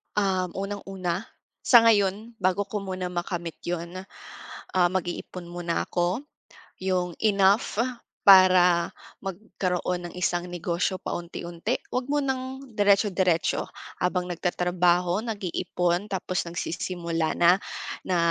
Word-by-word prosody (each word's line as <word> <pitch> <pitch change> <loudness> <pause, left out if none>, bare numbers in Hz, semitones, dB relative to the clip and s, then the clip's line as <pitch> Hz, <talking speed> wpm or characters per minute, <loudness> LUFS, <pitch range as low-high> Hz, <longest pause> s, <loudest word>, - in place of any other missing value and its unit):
Um, 190 -3 +1
unang-una, 195 0 -3 0.3
sa 235 -3 +7
ngayon, 215 +1 +2
bago 185 +2 +2
ko 205 +1 -4
muna 185 -2 -4
makamit 175 -1 -4
'yon, 175 +1 -3 0.7
ah, 180 -1 +4
mag-iipon 180 0 -4
muna 175 -1 -1
'ko. 180 +9 0 0.6
'Yong 180 -2 -1
enough, 200 +1 +3 0.4
para 185 -3 +7 0.3
magkaroon 180 -2 -2
ng - - -11
isang 175 -1 -1
negosyo 175 +1 -2
paunti-unti. 170 +4 -4
Huwag 250 0 -1
munang 265 -2 -2
diretso-diretso, 195 -4 +2 0.3
habang 180 0 -1
nagtatrabaho, 180 +2 +1
nag-iipon, 180 -3 -1
tapos 185 -2 -2
nagsisimula 170 -1 -2
na, 175 +2 +5 0.5
na 185 -2 +1
185 Hz, 100 wpm, -26 LUFS, 175-200 Hz, 0.7 s, sa